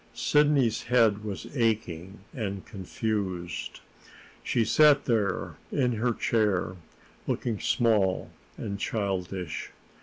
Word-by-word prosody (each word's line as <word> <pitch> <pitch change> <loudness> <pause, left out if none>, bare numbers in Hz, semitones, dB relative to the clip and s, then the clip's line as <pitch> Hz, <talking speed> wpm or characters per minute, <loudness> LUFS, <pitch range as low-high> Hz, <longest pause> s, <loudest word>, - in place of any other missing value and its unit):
Sidney's 145 -6 +3
head 115 -4 +3
was 100 -6 -5
aching 100 - -1
and 100 -6 -4
confused. 95 -3 -4 0.6
She 115 -2 +1
sat 150 +1 +5
there 105 -6 0
in 125 -3 +2
her 120 +2 +1
chair, 105 -5 +1 0.5
looking 115 -4 -1
small 105 -6 +2 0.3
and 100 -2 -4
childish. 95 -5 -3
105 Hz, 95 wpm, -28 LUFS, 95-120 Hz, 0.6 s, sat